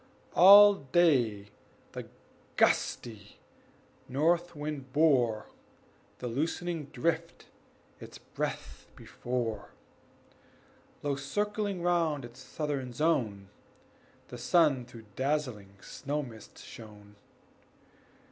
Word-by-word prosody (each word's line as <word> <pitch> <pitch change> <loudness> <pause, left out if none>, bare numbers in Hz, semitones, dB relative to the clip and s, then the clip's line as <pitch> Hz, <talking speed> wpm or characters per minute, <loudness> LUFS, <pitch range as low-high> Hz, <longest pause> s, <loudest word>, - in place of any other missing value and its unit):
All 205 +3 +9
day 130 - +1 0.4
the - - -8 0.5
gusty 105 -3 0 0.7
north 170 +5 +1
wind 145 -3 -6
bore 125 -8 +2 0.7
The - - -8
loosening 160 +5 -3
drift 165 +5 -3 0.5
its - - -11
breath - - -6
before; 120 -4 -4 1.3
Low 145 -1 0
circling 205 +6 -3
round 165 -6 +1
its 120 +2 -13
southern 135 -1 -4
zone, 120 -10 -1 0.8
The 125 - -9
sun 140 -2 +2
through 115 -2 -13
dazzling 130 -8 -2
snow 145 +2 -4
mist 115 -4 -12
shone. 105 -2 -13
140 Hz, 85 wpm, -30 LUFS, 120-165 Hz, 1.3 s, All